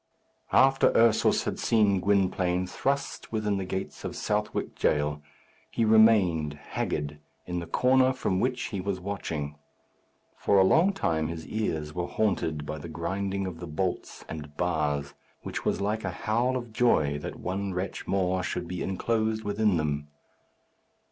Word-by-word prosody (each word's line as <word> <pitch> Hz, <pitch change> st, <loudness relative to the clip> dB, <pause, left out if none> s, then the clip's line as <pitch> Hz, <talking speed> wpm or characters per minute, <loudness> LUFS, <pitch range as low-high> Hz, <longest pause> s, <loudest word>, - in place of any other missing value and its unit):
After 135 Hz, 0 st, +5 dB
Ursus 115 Hz, -1 st, +4 dB
had -, -, -3 dB
seen 105 Hz, -4 st, +3 dB
Gwynplaine 95 Hz, -2 st, +1 dB
thrust 140 Hz, +9 st, -2 dB
within 105 Hz, -2 st, 0 dB
the 95 Hz, -, -3 dB
gates 95 Hz, +1 st, -5 dB
of -, -, -4 dB
Southwark 105 Hz, 0 st, -2 dB
Jail, 75 Hz, 0 st, 0 dB, 0.5 s
he 115 Hz, -, 0 dB
remained, 100 Hz, -9 st, +4 dB
haggard, 75 Hz, 0 st, -3 dB, 0.3 s
in 90 Hz, -1 st, -3 dB
the 85 Hz, -, -6 dB
corner 130 Hz, +7 st, +4 dB
from 95 Hz, -8 st, -1 dB
which 125 Hz, +2 st, -1 dB
he 100 Hz, -4 st, -3 dB
was 95 Hz, 0 st, -2 dB
watching. 80 Hz, -7 st, -4 dB, 0.8 s
For 100 Hz, -, +2 dB
a 95 Hz, -, +7 dB
long 165 Hz, -, +4 dB
time 80 Hz, -, 0 dB
his 80 Hz, -2 st, -6 dB
ears 80 Hz, -5 st, -2 dB
were 90 Hz, 0 st, -2 dB
haunted 80 Hz, -8 st, -1 dB
by 75 Hz, +1 st, -5 dB
the 85 Hz, -, -8 dB
grinding 95 Hz, +4 st, -2 dB
of 90 Hz, -3 st, -6 dB
the 85 Hz, -, -6 dB
bolts 90 Hz, +4 st, -3 dB
and 75 Hz, -2 st, -8 dB
bars, 75 Hz, -5 st, 0 dB, 0.3 s
which -, -, -5 dB
was -, -, 0 dB
like 105 Hz, +2 st, -1 dB
a -, -, -1 dB
howl 120 Hz, +4 st, 0 dB
of 120 Hz, -3 st, -7 dB
joy 75 Hz, -12 st, +2 dB
that -, -, -7 dB
one 95 Hz, 0 st, -3 dB
wretch 95 Hz, +2 st, -4 dB
more 95 Hz, -1 st, +1 dB
should 90 Hz, 0 st, -3 dB
be 90 Hz, 0 st, -4 dB
enclosed 110 Hz, +3 st, 0 dB
within 105 Hz, -2 st, +1 dB
them. 75 Hz, -1 st, -1 dB
95 Hz, 155 wpm, -28 LUFS, 80-110 Hz, 0.8 s, a